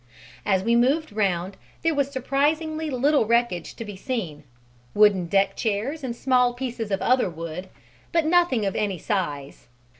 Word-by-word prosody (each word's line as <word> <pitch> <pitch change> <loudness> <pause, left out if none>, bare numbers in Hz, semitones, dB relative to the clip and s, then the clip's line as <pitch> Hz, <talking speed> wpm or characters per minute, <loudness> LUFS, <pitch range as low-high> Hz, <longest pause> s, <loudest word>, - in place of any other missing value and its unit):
As 190 -2 +2
we 230 +2 +2
moved 270 +3 +2
round, 190 -2 -1 0.3
there 330 0 +2
was 280 -2 0
surprisingly 305 +4 -1
little 275 -2 +2
wreckage 235 -7 0
to 230 - -7
be 205 -1 -7
seen: 185 - -4 0.5
wooden 205 -4 +4
deck 195 +2 +2
chairs 230 +8 -2
and 240 -3 -3
small 250 -1 +2
pieces 245 -3 -4
of 195 -1 -1
other 255 -5 +3
wood, 165 +2 -7 0.4
but 335 -2 +2
nothing 325 -10 +3
of 195 - -2
any 200 -3 -1
size. 150 -8 -3
235 Hz, 155 wpm, -24 LUFS, 195-275 Hz, 0.5 s, wooden